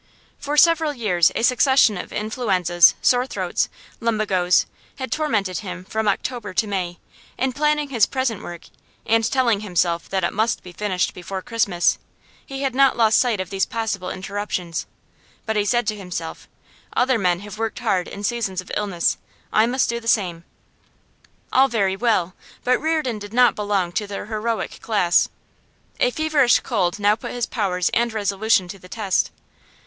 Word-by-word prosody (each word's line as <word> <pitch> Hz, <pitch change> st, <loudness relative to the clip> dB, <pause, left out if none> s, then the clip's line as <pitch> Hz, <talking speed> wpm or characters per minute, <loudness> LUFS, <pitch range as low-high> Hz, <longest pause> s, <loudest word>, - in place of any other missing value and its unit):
For 290 Hz, +1 st, -3 dB
several 325 Hz, -2 st, +5 dB
years 180 Hz, -9 st, +2 dB
a -, -, -1 dB
succession 250 Hz, -2 st, +4 dB
of 180 Hz, -, -6 dB
influenzas, 190 Hz, -6 st, +3 dB
sore 250 Hz, +1 st, +3 dB
throats, -, -, -1 dB, 0.3 s
lumbagoes, 205 Hz, -6 st, +2 dB, 0.3 s
had 260 Hz, -2 st, -6 dB
tormented 205 Hz, -, 0 dB
him 180 Hz, -3 st, -7 dB
from 220 Hz, +2 st, -2 dB
October 210 Hz, -1 st, -2 dB
to 220 Hz, -, +2 dB
May; 185 Hz, -4 st, -3 dB, 0.4 s
in 260 Hz, 0 st, 0 dB
planning 300 Hz, +1 st, +1 dB
his 235 Hz, -6 st, +3 dB
present 255 Hz, -6 st, -2 dB
work, 175 Hz, -3 st, -8 dB, 0.4 s
and 225 Hz, 0 st, +3 dB
telling 235 Hz, -2 st, +2 dB
himself 175 Hz, -4 st, -1 dB
that 190 Hz, -2 st, -1 dB
it 170 Hz, -, 0 dB
must 220 Hz, +3 st, 0 dB
be 180 Hz, -, -10 dB
finished 185 Hz, 0 st, -1 dB
before 190 Hz, +1 st, -6 dB
Christmas, 205 Hz, -7 st, +1 dB, 0.4 s
he 270 Hz, 0 st, -6 dB
had 270 Hz, -2 st, 0 dB
not 275 Hz, +1 st, +4 dB
lost 225 Hz, -2 st, +4 dB
sight 240 Hz, -5 st, +1 dB
of 185 Hz, -1 st, -4 dB
these 195 Hz, -1 st, 0 dB
possible 220 Hz, -6 st, -3 dB
interruptions. 190 Hz, -3 st, -4 dB, 0.6 s
But 220 Hz, -, -1 dB
he 205 Hz, -1 st, +1 dB
said 240 Hz, +2 st, +1 dB
to 215 Hz, -, -2 dB
himself: 180 Hz, -5 st, -6 dB, 0.5 s
'Other 250 Hz, -1 st, +2 dB
men 180 Hz, -2 st, +1 dB
have 210 Hz, +1 st, -9 dB
worked 225 Hz, -1 st, -2 dB
hard 195 Hz, -7 st, 0 dB
in 200 Hz, -, -8 dB
seasons 205 Hz, -4 st, -1 dB
of 185 Hz, -, -7 dB
illness; 195 Hz, -5 st, 0 dB, 0.3 s
I 215 Hz, +2 st, +4 dB
must 255 Hz, +2 st, +1 dB
do 235 Hz, 0 st, -2 dB
the 230 Hz, -, -11 dB
same.' 175 Hz, -7 st, +1 dB, 1.1 s
All 265 Hz, +1 st, +6 dB
very 200 Hz, -6 st, 0 dB
well, 195 Hz, -5 st, +1 dB, 0.3 s
but 255 Hz, 0 st, +2 dB
Reardon 310 Hz, -8 st, 0 dB
did 205 Hz, +1 st, -9 dB
not 250 Hz, 0 st, +5 dB
belong 200 Hz, -4 st, -1 dB
to 210 Hz, +3 st, -2 dB
the 200 Hz, -1 st, -5 dB
heroic 220 Hz, +1 st, -3 dB
class. 200 Hz, -6 st, +2 dB, 0.7 s
A -, -, +4 dB
feverish 295 Hz, -3 st, +3 dB
cold 185 Hz, -7 st, 0 dB
now 205 Hz, 0 st, +3 dB
put -, -, -7 dB
his 245 Hz, -2 st, -1 dB
powers 180 Hz, -5 st, -1 dB
and 235 Hz, 0 st, +1 dB
resolution 205 Hz, -2 st, +1 dB
to 195 Hz, +1 st, -8 dB
the 180 Hz, -, -15 dB
test. 200 Hz, -2 st, 0 dB
215 Hz, 170 wpm, -22 LUFS, 185-240 Hz, 1.1 s, All